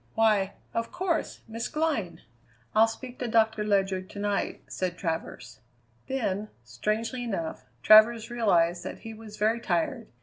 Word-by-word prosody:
Why, 210 -3 +3 0.2
of 230 0 -2
course, 360 -2 -2
Miss 230 +1 -4
Glynn!" 305 - -1 0.5
"I'll 220 +1 +6
speak 245 +3 -8
to 245 - -2
Doctor 220 -1 +2
Ledyard 195 -2 0
to - - -11
night," 205 0 -1
said 180 -1 -3
Travers. 160 - -4 0.5
Then, 215 -6 -1 0.2
strangely 215 - -2
enough, 190 -9 -4 0.2
Travers 220 +2 +7
realized 175 -7 +2
that - - -7
he 225 - -8
was 215 -1 -11
very 220 +3 +2
tired. 215 +4 -1
215 Hz, 140 wpm, -28 LUFS, 190-230 Hz, 0.5 s, Travers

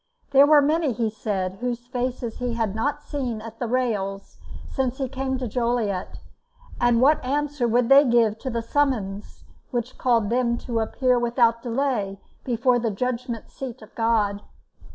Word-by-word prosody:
There 280 +1 +7
were 295 -1 +6
many, 305 -2 +1
he 225 -1 -1
said, 195 -3 -3
whose 245 -1 -3
faces 245 -2 -3
he 245 -2 -2
had 225 -4 -1
never 230 +7 -1
seen 255 -6 -3
at 225 +1 -10
the 240 - -2
rails 210 -6 -2 0.3
since 260 -2 -2
he 270 - -2
came 265 0 -2
to 255 -1 -3
Joliet; 230 -5 -1 0.6
and 240 -1 +3
what 290 +2 +4
answer 285 -1 -1
would 240 +1 +2
they 275 +2 +8
give 230 -4 +2
to 260 - -4
the 230 -2 -2
summons 225 -7 -1 0.3
which 245 0 -4
called 230 -4 +2
them 240 -1 +1
to 235 -2 -3
appear 250 +3 +1
without 235 -1 +2
delay 230 -6 -1 0.2
before 245 0 +2
the 230 -1 0
judgment 235 +2 -3
seat 250 -4 -7
of 215 - -16
God? 215 -3 +1
240 Hz, 165 wpm, -24 LUFS, 225-260 Hz, 0.6 s, they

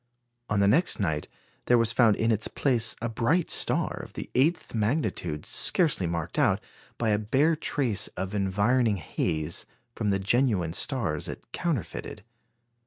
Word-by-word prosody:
On 105 -1 +1
the 100 - +4
next 165 - +2
night, 80 -7 -1 0.4
there 120 - +4
was 115 -1 +3
found 115 -4 +4
in 115 +1 +1
its 110 -1 +1
place 120 -5 +1
a - - +1
bright 125 +10 +1
star - - +2
of - - -12
the - - -7
eighth 155 +7 +1
magnitude, 110 - -1
scarcely 150 - +2
marked 85 -1 -3
out, - - +3 0.4
by 115 - 0
a 105 - +2
bare 135 +10 +2
trace 135 -8 0
of 95 +2 -4
environing 105 +3 +1
haze, 80 -1 -2 0.3
from 110 -3 -2
the 100 - +2
genuine 100 -5 +1
stars - - -1
it - - -9
counterfeited. 125 - -4
110 Hz, 155 wpm, -27 LUFS, 100-130 Hz, 0.4 s, the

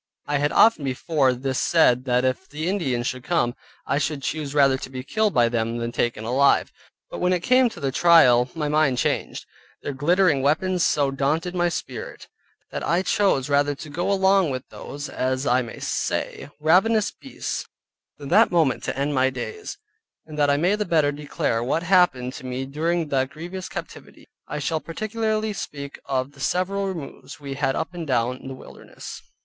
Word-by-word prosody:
I 145 -1 0
had 145 +1 +1
often 225 -9 +5
before 135 +1 +1
this 130 +1 -2
said 130 -7 +3
that 125 0 +2
if 130 +9 -2
the 155 +3 -4
Indians 135 -11 -1
should 130 -1 -3
come, 130 -8 +1 0.3
I 140 - 0
should 150 -2 -2
choose 150 -1 -3
rather 135 -2 +5
to - - -7
be 130 -1 -6
killed 215 +8 +1
by 120 -1 +5
them 115 0 -1
than 115 0 -3
taken 120 -2 -1
alive, 130 +5 +3 0.4
but - - -6
when 180 +1 +2
it 180 - 0
came 255 +2 +4
to 200 - -11
the 135 -3 -1
trial 130 -7 +5
my 155 -2 -2
mind 150 -3 +2
changed; - - -1 0.4
their 145 - -3
glittering 160 +1 +2
weapons 175 +6 +1
so 140 -4 +2
daunted 150 +6 -1
my 175 -1 +1
spirit, 165 - -6 0.4
that - - -4
I 170 +3 +1
chose 190 -10 +2
rather 145 0 +2
to 150 - -9
go 175 +6 -1
along 190 -2 +3
with 130 -1 -5
those 145 +1 -7
(as 130 +1 -2
I 125 -1 +3
may 120 -2 -8
say) - - -3
ravenous 195 +8 +3
beasts, 270 - -6 0.5
than 140 -2 -8
that - - +5
moment 160 -7 +1
to - - -3
end 140 +2 0
my 130 -1 +3
days; 130 - -6 0.5
and 155 - -10
that 145 -1 +2
I 140 - +3
may 180 +7 +2
the 210 - -1
better 160 -6 +2
declare 145 -5 -2
what 155 +7 0
happened 175 -9 +3
to - - -9
me 130 +1 -4
during 160 +3 -1
that 130 -1 +1
grievous 175 +5 -7
captivity, - - -9 0.2
I 150 - -4
shall 155 +2 -1
particularly 215 +4 -2
speak 140 -7 -7
of 130 0 -1
the 140 - -19
several 190 +7 0
removes 165 -8 -7
we 140 -1 -6
had 135 -1 0
up 165 - -3
and 170 -2 -6
down 125 0 -1
the 135 - -6
wilderness. - - -11
145 Hz, 190 wpm, -23 LUFS, 130-175 Hz, 0.5 s, often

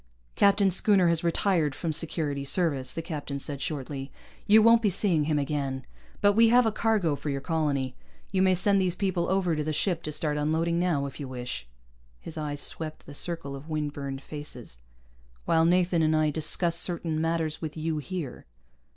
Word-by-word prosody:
"Captain 200 -1 +4
Schooner 190 -1 +3
has 170 0 +1
retired 170 -4 +1
from 165 -3 -3
Security 150 -3 -1
Service," 140 -4 0
the 165 - -5
captain 150 -4 -5
said 140 0 0
shortly. 135 -1 -5 0.4
"You 215 +1 +7
won't 230 +1 +6
be 215 - +2
seeing 175 -5 +1
him 150 -1 0
again. 140 -2 -2 0.4
But 205 0 +5
we 225 +2 +5
have 245 +1 +5
a 220 - +2
cargo 210 -8 +1
for 145 - -6
your 140 -1 -2
colony. 140 -4 -1 0.4
You 190 -2 +1
may 190 -1 +4
send 195 +2 +3
these 180 -1 0
people 185 -2 -1
over 185 -3 +1
to 150 - -2
the 155 - -2
ship 170 +1 0
to 155 - -5
start 150 0 -2
unloading 160 +3 0
now, 170 -6 0
if 140 - -8
you 140 - -5
wish 125 - -6 0.3
" - - -33
his 165 - -9
eye 150 -2 -3
swept 155 +2 -5
the 145 - -11
circle 155 -3 +1
of 140 +3 -10
windburned 145 -3 -4
faces 130 - -7 0.7
"while 160 0 +3
Nathan 175 0 +2
and 155 0 +2
I 155 -1 +2
discuss 165 +2 +1
certain 165 -3 +3
matters 165 -1 -1
with 155 -1 -6
you 155 0 -2
here." 155 -4 -6
160 Hz, 190 wpm, -27 LUFS, 145-180 Hz, 0.7 s, You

